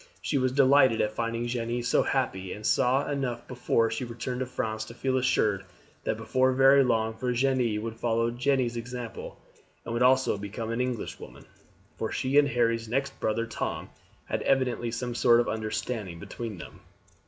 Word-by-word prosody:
She 140 - 0
was 130 0 +1
delighted 135 -3 +5
at 105 - +1
finding 115 +1 -2
Jeanne 120 0 -2
so 125 - +3
happy, 95 -8 -1
and 105 - -8
saw 130 +5 +2
enough 130 -4 -3
before 120 -2 +1
she 115 - -3
returned 125 +1 -4
to 130 - -2
France 110 -3 -3
to 115 - -11
feel 130 +1 -1
assured 110 -6 +1 0.4
that - - 0
before 130 +4 +1
very 135 +1 +6
long 110 -3 +1
Virginie 125 -1 0
would 115 +1 -5
follow 115 0 +1
Jeanne's 125 -1 0
example, 120 0 -6 0.5
and 115 - -4
would 120 - -1
also 130 -4 +4
become 110 +3 -5
an 115 +2 -1
Englishwoman, 125 - -5 0.5
for - - -2
she 135 +3 +2
and 145 - +4
Harry's 115 -3 +1
next 135 +3 -2
brother 115 +1 0
Tom 115 - -4 0.3
had - - -2
evidently 125 -3 +1
some 120 +1 -3
sort 120 0 +5
of 120 - +1
understanding 110 -3 -3
between 110 +4 -6
them. - - -10
120 Hz, 170 wpm, -28 LUFS, 115-130 Hz, 0.5 s, very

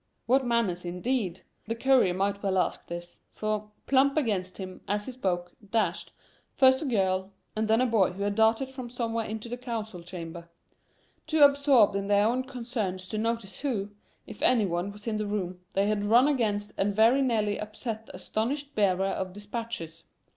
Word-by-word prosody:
What 265 +3 +3
manners 230 -8 0
indeed! 185 +1 -2 0.3
The 230 - -1
courier 245 -7 +3
might 200 +1 0
well 195 -2 0
ask 180 - -1
this. 175 0 -7
For, 215 0 -3 0.2
plump 275 +2 +3
against 200 -10 0
him, 185 -1 -7
as 205 +1 -1
he - - -5
spoke, 180 -8 -2 0.2
dashed, 225 +1 0 0.4
first 260 +1 +5
a - - -2
girl 190 -6 +1 0.3
and 215 0 0
then 220 +2 +4
a - - +4
boy 215 -7 +2
who 200 +2 -4
had 205 0 0
darted 225 +5 +2
from 255 -2 -7
somewhere 230 -2 -2
into 220 +1 -5
the 245 +1 -4
council 225 -7 -5
chamber. 170 -1 -8 0.8
Too 310 -1 +4
absorbed 280 -7 +5
in 200 0 -1
their 205 0 +4
own 250 +3 +1
concerns 230 -8 -4
to 215 - -2
notice 230 -3 -2
who, 215 -8 -2 0.3
if - - -11
any 235 -5 +4
one, 175 +2 -2
was 205 +1 -13
in 220 -2 -1
the 210 -1 -2
room, 185 -3 -3 0.2
they 195 +1 +3
had 210 0 0
run 235 +6 +5
against 215 -7 0
and 200 +1 +1
very 230 +6 +5
nearly 215 -5 +1
upset 220 +1 -5
the - - -10
astonished 280 +6 -3
bearer 195 -2 +2
of 190 -1 -2
dispatches. 205 -6 -6
215 Hz, 185 wpm, -28 LUFS, 195-240 Hz, 0.8 s, first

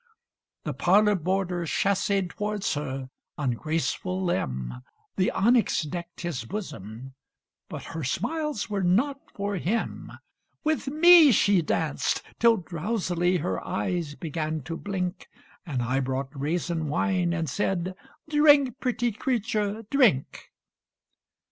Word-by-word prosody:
The 150 - -3
parlor 205 +9 +4
boarder 180 -1 -1
chasséed 195 +1 +1
tow'rds 210 -4 -1
her 135 -3 -4 0.3
on 140 -4 0
graceful 165 +7 -2
limb; 65 - -2 0.3
The 185 - +2
onyx 235 -4 +2
decked 170 +2 -6
his 170 -9 -3
bosom 120 - -7 0.6
but - - -6
her 160 -1 -6
smiles 290 - -2
were 205 -3 -2
not 240 +11 +2 0.2
for 200 0 -2
him: 210 +7 -2 0.5
With 310 -2 0
me 315 +1 +8
she 200 -3 +4
danced 155 -1 -1 0.2
till 230 -1 +5
drowsily 180 0 -1
her 95 - -2
eyes 155 - -2
"began 155 -1 -3
to 165 +5 -5
blink," 185 0 -4 0.4
And 130 -6 -1
I 130 +3 0
brought 130 +1 -2
raisin 160 +3 -2
wine, 180 +3 +1
and 165 -2 -1
said, 185 +3 -1 0.3
"Drink, 290 -4 +5
pretty 240 -2 0
creature, 220 -2 -1
drink!" 240 - +2
180 Hz, 120 wpm, -26 LUFS, 155-215 Hz, 0.6 s, me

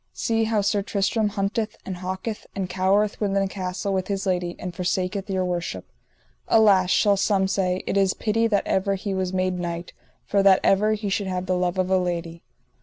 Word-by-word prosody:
See 225 -1 0
how 220 -1 +1
Sir 200 0 +1
Tristram 205 +2 0
hunteth, 210 +2 -2
and 185 -2 -5
hawketh, 190 +4 -5
and 195 -2 -2
cowereth 195 +4 +1
within 195 -1 +1
a - - 0
castle 190 +1 -3
with 185 -1 -1
his 200 -1 -2
lady, 180 -2 -1
and 180 -1 -6
forsaketh 185 +2 -2
your 190 -1 0
worship. 175 -1 -3 0.6
Alas, 200 -5 +5
shall 200 +1 +3
some 195 -1 +2
say, 185 -1 0
it - - -1
is 195 -1 +2
pity 225 +1 +1
that 205 -3 +1
ever 195 +1 +1
he 195 +1 -4
was 185 -1 -1
made 185 -1 -1
knight, 170 0 -5 0.4
or 200 - +5
that 195 -1 +6
ever 210 +2 +3
he 210 -1 -3
should 195 0 -1
have 185 -1 -2
the 185 0 0
love 180 0 -1
of 185 0 0
a 190 - +4
lady. 170 -2 -3
190 Hz, 200 wpm, -24 LUFS, 185-205 Hz, 0.6 s, that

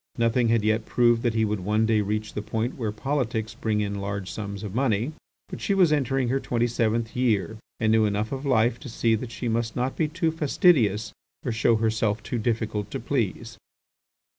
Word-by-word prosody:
Nothing 115 +1 +2
had 115 -1 +2
yet 110 +1 +1
proved 120 -1 +3
that 120 -2 0
he 110 0 +3
would 105 -1 -1
one 105 +4 +1
day 110 -1 +2
reach 105 +1 -2
the 105 - -3
point 110 +3 -2
where 110 -5 -2
politics 115 -2 -2
bring 110 -2 -1
in 100 -1 -3
large 100 -1 -4
sums 100 -1 -6
of 100 -3 -5
money. 120 +1 +1 0.4
But - - -8
she 200 - +1
was 180 -5 +4
entering 135 -3 +1
her 135 +2 +1
twenty 120 -2 0
seventh 115 -1 0
year 110 -4 0 0.2
and 110 -1 +2
knew 110 -1 +4
enough 105 +1 -1
of 135 0 -4
life 120 -3 +2
to 135 - -9
see 115 0 +1
that 115 +2 -2
she 115 +2 -4
must 115 0 -1
not 125 +2 -1
be 160 - +1
too 165 +1 0
fastidious 135 - +2 0.3
or 125 - 0
show 115 +1 +3
herself 110 -1 0
too 120 - -3
difficult 110 -2 -1
to - - -4
please. 115 -2 -2
115 Hz, 205 wpm, -25 LUFS, 105-125 Hz, 0.4 s, was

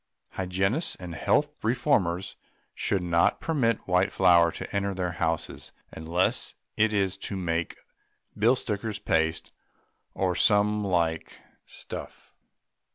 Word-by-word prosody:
Hygienists 95 - 0
and 90 -2 -8
health 150 - 0
reformers 100 - 0 0.4
should 95 -3 -1
not 85 -1 +2
permit 120 -9 0
white 90 +1 +2
flour 85 -3 +5
to - - -7
enter 100 -1 -1
their 90 -1 -2
houses, 80 -1 -3 0.2
unless 85 +4 -1 0.2
it 110 0 +3
is 95 -2 0
to 100 - -5
make 85 -2 -2 0.6
bill 115 +5 +4
stickers' 110 -3 -3
paste 80 -4 0 0.6
or 90 -2 0
some 105 +3 +3
like 85 -4 -1 0.3
stuff. - - -9
95 Hz, 115 wpm, -27 LUFS, 85-105 Hz, 0.6 s, flour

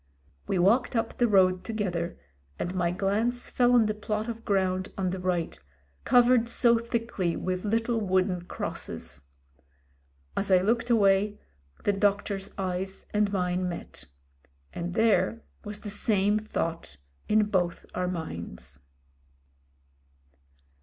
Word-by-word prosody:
We 190 - 0
walked 220 +9 +3
up 225 0 -1
the 240 - +4
road 185 -3 +4
together, 180 -6 -2 0.4
and 175 - -3
my 175 -2 +1
glance 210 +7 -1
fell 245 0 +3
on 235 -2 +5
the 215 - 0
plot 215 +1 -3
of 230 -1 -5
ground 185 -1 0
on 185 -2 0
the 190 - -4
right, 180 -2 -1 0.5
covered 245 -1 +5
so 235 -1 +4
thickly 230 -7 -2
with 185 +1 -3
little 230 +2 +1
wooden 185 -3 0
crosses. 70 - -5 1.1
As 200 - -1
I 185 - +7
looked 230 +3 +1
away 205 -2 +3 0.4
the 205 - +2
doc 200 0 +2
tor's 195 -2 -4
eyes 190 0 -3
and 210 -1 +2
mine 180 -1 0
met 170 - -7 0.7
And 175 +1 -4
there 230 +1 +2 0.2
was 210 0 -7
the 205 - -4
same 205 0 +2
thought 165 - -3 0.3
in 215 0 +4
both 175 -3 0
our 180 0 -1
minds. 85 - -6
195 Hz, 135 wpm, -28 LUFS, 180-220 Hz, 1.1 s, I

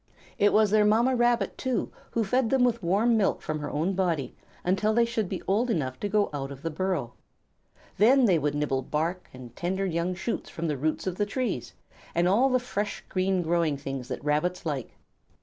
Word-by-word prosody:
It 205 - +5
was 215 -2 +4
their 215 0 +5
Mamma 230 +5 +3
Rabbit, 240 -4 +1
too, 260 -2 -1 0.2
who 230 - 0
fed 240 +3 +1
them 265 0 +3
with 235 -2 +2
warm 210 +7 +2
milk 205 - +1
from 155 0 -3
her 150 - -4
own 165 +6 -1
body 170 -9 -1 0.3
until 195 +4 +1
they 235 0 +4
should 225 -5 -2
be 190 - -4
old 220 +6 +2
enough 130 - -1
to 205 - -2
go 210 0 +1
out 135 -1 -4
of 140 0 -10
the 165 - -2
burrow. 160 -8 -2 0.9
Then 250 +5 +6
they 180 -7 +4
would 145 0 -1
nibble 140 -3 0
bark 165 +6 -2
and 125 -2 -12
tender 190 +3 -1
young 175 0 -1
shoots 210 +6 -4
from 165 0 -4
the 150 - 0
roots 155 +4 -2
of 185 -1 -3
the 205 - +1
trees, 255 +4 -3 0.4
and 175 +1 +3
all 230 +9 +4
the 255 - +3
fresh, 210 -4 -3
green, 185 -1 +1
growing 165 -3 +1
things 135 -2 -5
that 130 - -5
Rabbits 170 +5 0
like. 140 -7 -4
185 Hz, 205 wpm, -27 LUFS, 155-220 Hz, 0.9 s, Then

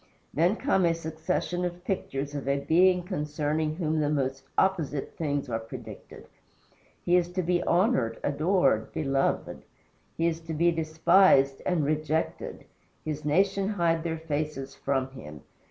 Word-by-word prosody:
Then 170 - +3
come 225 -7 +1
a 165 -1 +2
succession 160 +2 -2
of 175 0 -4
pictures 145 -7 -3
of 140 -2 -5
a 140 0 +2
Being 180 +4 +3
concerning 150 -3 -2
whom 160 -2 -1
the 150 -1 +1
most 135 -2 -1
opposite 160 -7 0
things 145 -3 -2
are 115 -2 -2
predicted. 115 -2 -10 0.8
He 175 - +4
is 175 -1 +2
to 185 0 -1
be 175 +1 +1
honored, 170 - +2
adored, 145 - +1
beloved; 135 -2 -1 0.6
he 165 - +1
is 165 -1 0
to 165 -1 -6
be 170 +3 +3
despised 160 -3 +4
and 175 -5 +1
rejected 155 +1 -2 0.4
his 155 -1 -4
nation 195 +6 +2
hide 170 -5 +1
their 165 -1 -2
faces 150 -3 -3
from 135 -1 -2
him. 75 - -10
155 Hz, 145 wpm, -27 LUFS, 140-175 Hz, 0.8 s, He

